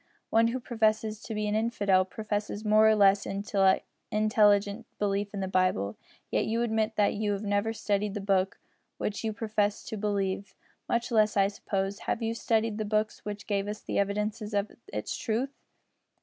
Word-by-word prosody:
One 225 +1 +5
who 245 +3 -1
professes 220 -3 0
to 220 - -6
be 210 0 -1
an 210 - 0
infidel 205 -4 +2
professes 210 +1 -4
more 215 +1 +6
or 220 - +5
less 200 -1 +4
intelligent 195 -1 +2 1.0
disbelief 200 0 -1
in 200 - -4
the 190 - -1
Bible, 185 - +1 0.4
yet - - +1
you 230 +2 +1
admit 220 -1 0
that 205 -1 +3
you 210 0 0
have 200 +1 -4
never 205 +2 +1
studied 210 -2 -1
the - - -2
book 195 -1 +1 0.4
which 210 - -3
you 220 - 0
profess 210 -1 -1
to - - -5
disbelieve 200 -1 -2 0.3
much 235 +1 0
less, 215 -2 +3
I 195 0 +4
suppose, 195 -1 -3
have 230 - -2
you 225 0 0
studied 225 -1 0
the - - 0
books 215 +1 -1
which 210 0 -5
give 200 -1 -1
us 210 +1 -5
the - - -2
evidences 210 +2 -1
of 200 0 0 0.2
its 105 - -3
truth." 240 +5 -1
210 Hz, 175 wpm, -29 LUFS, 200-220 Hz, 1.0 s, more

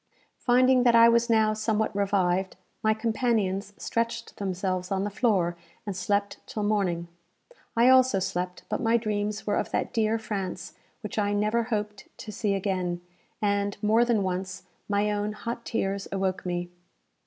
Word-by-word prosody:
Finding 255 +1 +4
that 240 -1 +4
I 230 0 +8
was 235 +1 +3
now 220 -1 +4
somewhat 215 -1 -1
revived, 190 -2 +1 0.3
my 220 0 +2
companions 220 -3 0
stretched 230 0 -3
themselves 185 -1 -2
on 195 0 0
the 205 - -2
floor, 190 -5 +1 0.3
and 200 -3 -4
slept 200 +2 -1
till 210 - -4
morning. 190 -5 0 0.7
I 235 +2 +6
also 260 -4 +5
slept; 180 -1 -3
but - - -2
my 230 -1 +3
dreams 210 -1 -2
were 205 - +1
of - - -1
that - - -2
dear 220 0 +2
France 195 -5 -5 0.3
which 215 -1 -4
I 205 0 +1
never 215 +3 +1
hoped 210 -3 -3
to 215 - -8
see 205 -1 -1
again, 185 -3 -2 0.4
and, 200 0 0
more 220 +3 +4
than 235 -4 +2
once, 185 0 -3 0.3
my 205 +1 +1
own 210 0 -1
hot 235 +2 -5
tears 195 -2 -2
awoke 190 -1 -1
me. 175 0 -3
205 Hz, 160 wpm, -27 LUFS, 190-225 Hz, 0.7 s, I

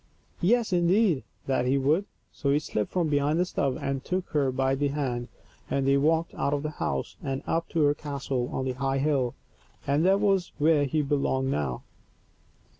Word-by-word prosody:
Yes, 220 +2 +2
indeed, 175 -2 +3 0.2
that 130 -2 0
he 135 +2 +3
would. 150 +8 +2 0.3
So 140 - -2
he 140 - +4
slipped 110 -8 -2
from 175 -3 +1
behind 145 +1 +1
the 180 - +3
stove 140 -7 -1
and 135 -1 -2
took 185 0 -2
her 140 -4 +2
by 130 +1 +1
the 145 +2 +1
hand, 130 -4 -2 0.4
and 135 -1 0
they 135 - +4
walked 160 +3 +1
out 140 - 0
of 145 - -3
the 155 - -2
house - - -2
and 135 -1 -3
up 165 +1 -1
to 160 - +1
her 145 0 +4
castle 140 -4 -3
on 130 - -2
the 130 - 0
high 135 +1 -1
hill, 135 -4 +1 0.5
for 140 +1 0
that 190 +4 +4
was 195 -3 +1
where 150 -1 +3
he 150 +3 0
belonged 135 -2 0
now. 70 - -2
145 Hz, 190 wpm, -27 LUFS, 135-165 Hz, 0.5 s, he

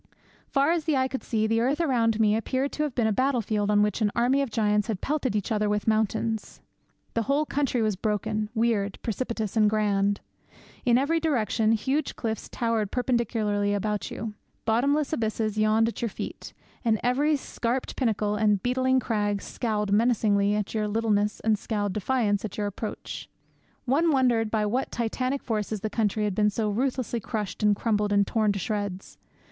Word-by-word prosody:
Far 280 +3 +2
as 335 -3 0
the 310 -4 +2
eye 260 0 +2
could 265 0 -4
see, 220 -2 0
the 225 +1 +2
earth 270 +6 +1
around 235 -8 +2
me 215 -1 +4
appeared 260 +5 -1
to - - -4
have 295 -4 -1
been 235 - +2
a 220 - +2
battle 260 +4 +1
field 210 -1 -1
on 210 0 +4
which 210 +2 -1
an 210 - +3
army 250 +4 +3
of 275 - -1
giants 210 -1 +1
had 215 -5 -2
pelted 275 -4 -1
each 205 0 -2
other 210 -1 +1
with 210 0 -1
mountains. 220 0 0 0.5
The 230 - +1
whole 290 +2 +2
country 275 -5 0
was 215 -2 +1
broken, 210 +1 -1
weird, 220 -3 +1
precipitous, 225 -2 -3
and 215 -2 +5
grand. 205 -1 +1 0.7
In 240 -1 +5
every 300 +5 +2
direction 225 -7 +1
huge 270 +6 -1
cliffs 220 -2 -4
towered 230 -4 -1
perpendicularly 220 -5 0
about 210 +1 -2
you; 220 -2 -5 0.3
bottomless 280 +7 +2
abysses 220 -4 -1
yawned 215 +1 +3
at 230 - -4
your 235 - 0
feet; - - -7 0.3
and 220 -3 +2
every 280 +5 +2
scarped 250 -2 -3
pinnacle 215 -4 0
and 210 -2 +2
beetling 260 +1 +2
crag 205 -4 0
scowled 210 -2 -2
menacingly 205 -2 +3
at 210 -1 -2
your 215 -1 0
littleness 210 -1 +1
and 220 -2 +2
scowled 205 -3 -2
defiance 210 -2 0
at 215 - -5
your 210 - -1
approach. 205 +2 -6 0.6
One 310 +6 +3
wondered 245 -5 +2
by 215 -1 +1
what 245 +6 -1
titanic 255 +4 -2
forces 215 -2 -2
the 215 - -3
country 215 -1 0
had 205 -2 0
been 210 +2 +3
so 210 0 -1
ruthlessly 245 +1 -1
crushed 215 -4 -4
and 210 -1 +4
crumbled 210 -1 0
and 200 0 +4
torn 215 -2 +1
to - - -3
shreds. 200 -1 -4
220 Hz, 185 wpm, -26 LUFS, 210-250 Hz, 0.7 s, and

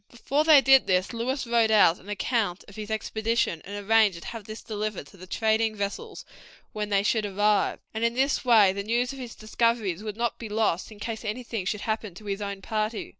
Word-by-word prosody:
Before 275 +5 -1
they 310 -3 +7
did 270 -1 +5
this 185 +4 +1
Lewis 260 +4 -2
wrote 235 -1 +2
out 205 -6 +5
an 200 - -14
account 205 -2 -1
of 200 - -14
his 215 -1 -7
expedition, 220 -4 -1
and 205 +1 -7
arranged 215 -5 +4
to - - -10
have 225 -3 -8
this 215 +1 -8
delivered 215 -6 -4
to 195 - -17
the 185 +1 -12
trading 220 +2 +1
vessels 200 -1 -5 0.5
when 210 -1 -3
they 200 -1 +2
should 220 +1 +1
arrive, 205 +1 +1 0.2
and 220 +1 -3
in 235 0 +1
this 270 +2 +1
way 220 -6 +5
the 200 - -3
news 240 +5 0
of 270 - -10
his 245 -3 -7
discoveries 220 -4 0
would 215 -1 -6
not 235 0 -2
be 225 - -7
lost 210 -3 0
in 210 - -13
case 220 +1 -5
anything 225 -2 -4
should 205 +2 -2
happen 220 -4 -3
to 210 - -12
his 200 0 -3
own 200 -1 -5
party. 215 0 -2
215 Hz, 220 wpm, -26 LUFS, 200-230 Hz, 0.5 s, they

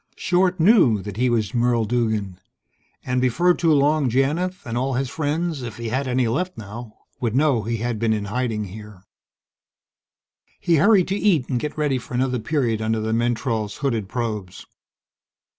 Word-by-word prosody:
Short 180 0 +1
knew 165 - +5
that 105 -1 -7
he 125 +1 +2
was 115 -1 0
Merle 120 -1 +2
Duggan, 110 -5 -1 0.7
and 125 0 0
before 170 +9 +3
too 165 -2 +1
long 145 -1 +3
Janith, 155 +9 0
and 115 -1 -4
all 130 +2 -1
his 130 0 -2
friends 155 0 -2
if 115 -3 -7
he 115 -1 -4
had 130 +3 -1
any 125 -1 +1
left 180 +10 -2
now 110 +1 -9 0.2
would 120 -3 -1
know 140 -4 +3
he 115 +3 -2
had 115 0 -3
been 115 0 +1
in 105 -2 -1
hiding 110 0 -2
here. 105 -1 -10 1.6
He 170 -2 +2
hurried 200 +1 +4
to 195 - 0
eat 185 -11 +2
and 125 - 0
get 150 +4 -5
ready 145 -4 0
for 125 0 -8
another 125 0 0
period 115 -3 -1
under 110 0 0
the 110 +1 -2
mentrol's 115 -2 -1
hooded 115 -7 -1
probes. 105 -7 -4
125 Hz, 175 wpm, -22 LUFS, 110-145 Hz, 1.6 s, knew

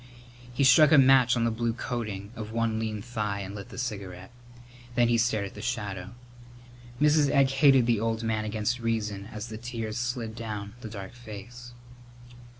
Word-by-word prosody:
He 125 +3 0
struck 140 +3 +7
a 155 - +7
match 130 -2 +6
on 115 - +1
the 115 - +2
blue 115 +1 -1
coating 110 -4 -4
of 110 -1 -6
one 115 -1 0
lean 110 -2 -3
thigh 105 -4 -3
and 100 0 -6
lit 100 -1 -8
the - - -11
cigarette, 100 -5 -5 0.6
then 120 -1 +3
stared 110 -3 +1
at 100 - -8
the - - -9
shadow. 105 -4 -4 0.8
Mrs. 150 -1 +4
Egg 135 -1 +3
hated 135 -2 +5
the 115 -3 +2
old 115 +1 -1
man 110 -1 -1
against 110 +3 -1
reason 105 -4 -2
as 105 +2 -6
the 110 -1 -7
tears 115 -3 -5
slid 120 -2 -3
down 105 -3 -6
the 110 - -7
dark 100 -2 -8
face. 120 +1 -10
115 Hz, 175 wpm, -27 LUFS, 105-120 Hz, 0.8 s, struck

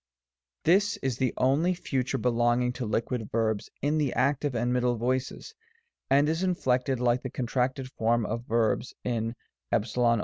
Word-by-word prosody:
This 195 +5 +3
is 130 -3 -1
the 130 -2 +2
only 150 +8 +2
Future 135 -7 -2
belonging 120 0 +1
to 125 -2 -4
Liquid 115 0 -2
Verbs 110 -2 0
in 150 +2 +2
the 145 -4 +1
Active 140 +1 +1
and 120 +2 0
Middle 125 -1 +1
voices, 130 - -2 0.6
and 140 +2 +4
is 160 +2 0
inflected 130 -8 +1
like 120 0 +2
the 130 - -4
contracted 130 +2 -1
form 115 -1 +1
of 115 +3 -4
verbs 115 +2 0
in 115 -1 -2 0.4
s 110 - 0
g)* 125 - -1
III. 115 -1 +4
125 Hz, 165 wpm, -28 LUFS, 120-135 Hz, 0.6 s, and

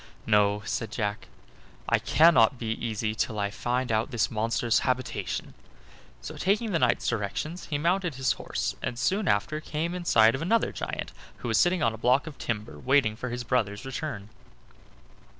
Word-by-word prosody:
"No," 105 -1 +3
said 115 - -2
Jack, 105 -2 -3 0.6
"I - - +3
cannot 145 -6 +5
be 115 -2 -3
easy 110 -1 -2
till 110 0 -2
I 100 -1 -1
find 125 +3 -1
out 110 +3 +1
this 120 -4 0
monster's 115 +1 +1
habitation." 130 -1 -2 0.7
So, - - -8
taking 210 +4 +1
the 165 - +1
knight's 125 -3 +2
directions, 120 - -3
he 145 - -1
mounted 175 +1 0
his 130 -1 +1
horse - - -3
and 120 - -3
soon 190 - 0
after 105 +10 +1
came 160 +3 -3
in 180 -1 -5
sight 110 -6 +5
of 130 - -3
another 225 +7 +2
giant, - - -4 0.3
who - - -5
was 115 - +3
sitting 175 -2 +3
on 115 - +2
a 110 - -9
block 130 +5 +3
of 155 -4 -9
timber 105 -10 -4
waiting 130 - +2
for 125 +3 -5
his 120 +1 -4
brother's 115 -2 -1
return. 130 -6 -5
120 Hz, 175 wpm, -27 LUFS, 110-155 Hz, 0.7 s, cannot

